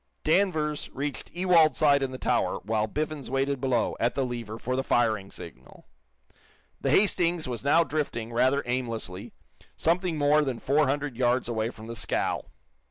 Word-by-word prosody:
Danvers 155 Hz, -4 st, +1 dB
reached 140 Hz, +1 st, -4 dB
Ewald's 175 Hz, -2 st, +4 dB
side 145 Hz, -2 st, +4 dB
in 135 Hz, -, 0 dB
the 130 Hz, -, -7 dB
tower, -, -, 0 dB
while 110 Hz, +1 st, 0 dB
Biffens 150 Hz, +3 st, -4 dB
waited 135 Hz, 0 st, -1 dB
below, 125 Hz, -4 st, +1 dB
at 120 Hz, +1 st, +1 dB
the 135 Hz, -, 0 dB
lever, 115 Hz, -3 st, -5 dB
for 125 Hz, +3 st, -3 dB
the 130 Hz, -, +1 dB
firing 110 Hz, -6 st, +1 dB
signal. 65 Hz, -, -12 dB, 0.9 s
The -, -, -1 dB
"Hastings" 175 Hz, -5 st, +2 dB
was 120 Hz, -2 st, -4 dB
now 160 Hz, +4 st, +4 dB
drifting, 135 Hz, -6 st, -3 dB
rather 130 Hz, +4 st, +2 dB
aimlessly, 115 Hz, -7 st, -4 dB, 0.5 s
something 170 Hz, 0 st, +1 dB
more 150 Hz, +1 st, +4 dB
than 135 Hz, -5 st, -2 dB
four 145 Hz, +4 st, +2 dB
hundred 140 Hz, -2 st, -2 dB
yards 125 Hz, 0 st, +1 dB
away 115 Hz, -1 st, -1 dB
from 110 Hz, -2 st, -11 dB
the 115 Hz, +1 st, -7 dB
scow. 105 Hz, -, -1 dB
135 Hz, 165 wpm, -27 LUFS, 120-150 Hz, 0.9 s, Ewald's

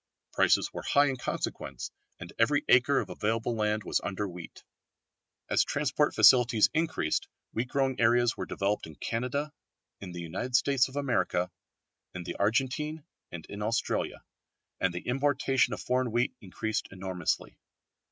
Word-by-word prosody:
Prices -, -, +3 dB
were -, -, -5 dB
high 145 Hz, 0 st, +3 dB
in 135 Hz, -, -2 dB
consequence -, -, -4 dB, 0.3 s
and -, -, -9 dB
every 145 Hz, +6 st, +3 dB
acre 130 Hz, +3 st, +5 dB
of -, -, -7 dB
available 115 Hz, +2 st, -1 dB
land 105 Hz, -1 st, 0 dB
was -, -, 0 dB
under 100 Hz, +1 st, -2 dB
wheat. 90 Hz, -2 st, -10 dB, 0.8 s
As -, -, +3 dB
transport -, -, 0 dB
facilities 120 Hz, -4 st, +6 dB
increased 160 Hz, -, 0 dB, 0.3 s
wheat 120 Hz, +3 st, -1 dB
growing 135 Hz, 0 st, 0 dB
areas 120 Hz, +1 st, +4 dB
were -, -, -5 dB
developed 100 Hz, -2 st, -1 dB
in 80 Hz, -, -11 dB
Canada, 130 Hz, -, -2 dB, 0.5 s
in 95 Hz, -2 st, -8 dB
the 85 Hz, -1 st, -6 dB
Western 125 Hz, +10 st, -4 dB
States 135 Hz, 0 st, +3 dB
of 130 Hz, -, -13 dB
America, 125 Hz, -10 st, 0 dB, 0.6 s
in 90 Hz, -, -5 dB
the -, -, -5 dB
Argentine, 135 Hz, +8 st, 0 dB, 0.3 s
and 85 Hz, -2 st, -7 dB
in 100 Hz, -, -8 dB
Australia, 115 Hz, +3 st, -1 dB, 0.6 s
and 95 Hz, -, +1 dB
the 90 Hz, +1 st, -6 dB
importation 135 Hz, 0 st, +2 dB
of -, -, -4 dB
foreign 125 Hz, -1 st, 0 dB
wheat 120 Hz, +2 st, +1 dB
increased 105 Hz, +3 st, -3 dB
enormously. 95 Hz, -3 st, -3 dB
120 Hz, 150 wpm, -29 LUFS, 100-135 Hz, 0.8 s, facilities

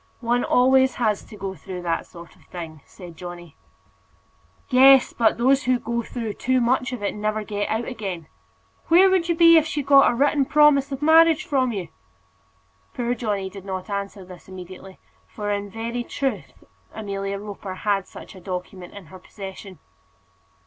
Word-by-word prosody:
"One 240 Hz, +1 st, 0 dB
always 260 Hz, +1 st, +3 dB
has 215 Hz, -4 st, 0 dB
to 210 Hz, -, -13 dB
go 195 Hz, -1 st, -5 dB
through 180 Hz, +2 st, -8 dB
that 165 Hz, -1 st, -2 dB
sort 170 Hz, -1 st, -13 dB
of -, -, -24 dB
thing," 160 Hz, -4 st, -9 dB
said 175 Hz, -3 st, -12 dB
Johnny. 175 Hz, -2 st, -10 dB, 1.1 s
"Yes; 265 Hz, 0 st, +6 dB
but 225 Hz, -2 st, +2 dB
those 265 Hz, +4 st, +2 dB
who 255 Hz, 0 st, +2 dB
go 235 Hz, 0 st, -3 dB
through 230 Hz, -2 st, -5 dB
too 255 Hz, +4 st, 0 dB
much 250 Hz, +1 st, +1 dB
of 245 Hz, -5 st, -6 dB
it 200 Hz, -, -1 dB
never 215 Hz, +1 st, -2 dB
get 205 Hz, -1 st, -3 dB
out 225 Hz, +2 st, -1 dB
again. 195 Hz, -9 st, -6 dB, 0.6 s
Where 370 Hz, +3 st, +6 dB
would 355 Hz, -2 st, +1 dB
you 340 Hz, -, +2 dB
be 335 Hz, 0 st, +7 dB
if 315 Hz, -1 st, +3 dB
she 300 Hz, -2 st, -3 dB
got 275 Hz, 0 st, +6 dB
a -, -, -1 dB
written 285 Hz, +2 st, +2 dB
promise 290 Hz, -1 st, +4 dB
of 275 Hz, +1 st, -5 dB
marriage 320 Hz, 0 st, +5 dB
from 260 Hz, -3 st, 0 dB
you?" 190 Hz, -6 st, -5 dB, 1.1 s
Poor 240 Hz, -1 st, -1 dB
Johnny 210 Hz, -5 st, -3 dB
did 190 Hz, 0 st, -10 dB
not 190 Hz, +1 st, -6 dB
answer 200 Hz, -1 st, -5 dB
this 180 Hz, -1 st, -14 dB
immediately, 185 Hz, 0 st, -11 dB, 0.3 s
for 205 Hz, -1 st, -5 dB
in 205 Hz, 0 st, -3 dB
very 230 Hz, +3 st, -4 dB
truth 270 Hz, +2 st, -4 dB, 0.3 s
Amelia 200 Hz, -2 st, -4 dB
Roper 200 Hz, -2 st, -8 dB
had 200 Hz, -1 st, -1 dB
such -, -, -12 dB
a 185 Hz, -, -13 dB
document 180 Hz, 0 st, -7 dB
in 200 Hz, -3 st, -10 dB
her 185 Hz, -, -10 dB
possession. 190 Hz, -1 st, -10 dB
215 Hz, 175 wpm, -23 LUFS, 190-260 Hz, 1.1 s, be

